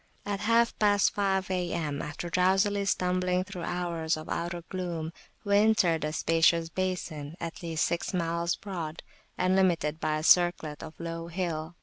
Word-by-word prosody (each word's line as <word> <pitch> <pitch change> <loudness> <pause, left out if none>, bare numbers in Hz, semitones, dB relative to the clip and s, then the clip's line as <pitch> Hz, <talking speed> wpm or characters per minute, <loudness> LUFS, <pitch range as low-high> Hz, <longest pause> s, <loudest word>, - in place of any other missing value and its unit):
At 200 -1 -2
half 230 +2 +3
past 205 -2 +4
five 190 -2 0
A.M., 170 -5 -2
after 155 +3 -5
drowsily 195 +3 +2
stumbling 180 -1 +1
through 185 -2 -8
hours 170 -3 -1
of 155 - -9
outer 170 0 -3
gloom, 170 -4 -4 0.3
we 200 -1 +3
entered 205 -7 +3
a 150 - -1
spacious 165 +1 +2
basin 165 -4 -3
at 170 -1 -6
least 165 -2 0
six 170 - -2
miles 170 -1 0
broad, 170 -5 -6 0.3
and 185 +1 +2
limited 165 -5 +2
by 155 -1 0
a 155 - -4
circlet 175 -3 +3
of 155 - -10
low 165 0 -5
hill. 170 -2 -3
175 Hz, 155 wpm, -29 LUFS, 165-185 Hz, 0.3 s, past